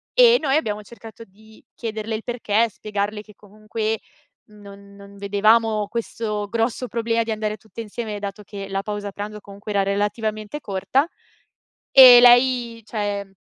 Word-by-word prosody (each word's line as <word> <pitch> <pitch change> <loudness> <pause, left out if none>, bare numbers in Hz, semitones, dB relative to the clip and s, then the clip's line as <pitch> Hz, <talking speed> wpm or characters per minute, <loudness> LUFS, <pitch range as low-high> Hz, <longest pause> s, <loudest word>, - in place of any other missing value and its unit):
e - - +6
noi 275 -2 +1
abbiamo 210 -9 -1
cercato 225 +1 -13
di 215 +2 -20
chiederle 220 -1 -4
il 215 - -6
perché, 230 -2 0
spiegarle 210 0 -4
che 210 -1 -18
comunque 215 +1 -4 0.5
non 200 -1 -15
non 200 0 -14
vedevamo 210 +2 +2
questo 210 -2 -4
grosso 230 +2 -2
problema 230 0 0
di 225 - -4
andare 215 -1 -2
tutte 220 -1 -15
insieme, 220 -1 -5
dato 205 +1 -6
che, 200 -1 -8
la 195 0 -2
pausa 205 -1 -5
pranzo 210 +1 -6
comunque 200 +1 -10
era 200 -1 +2
relativamente 210 +5 -2
corta, 255 - 0 0.8
e 255 -2 +10
lei 245 -1 +4
cioè 205 -3 -4
215 Hz, 145 wpm, -22 LUFS, 205-230 Hz, 0.8 s, e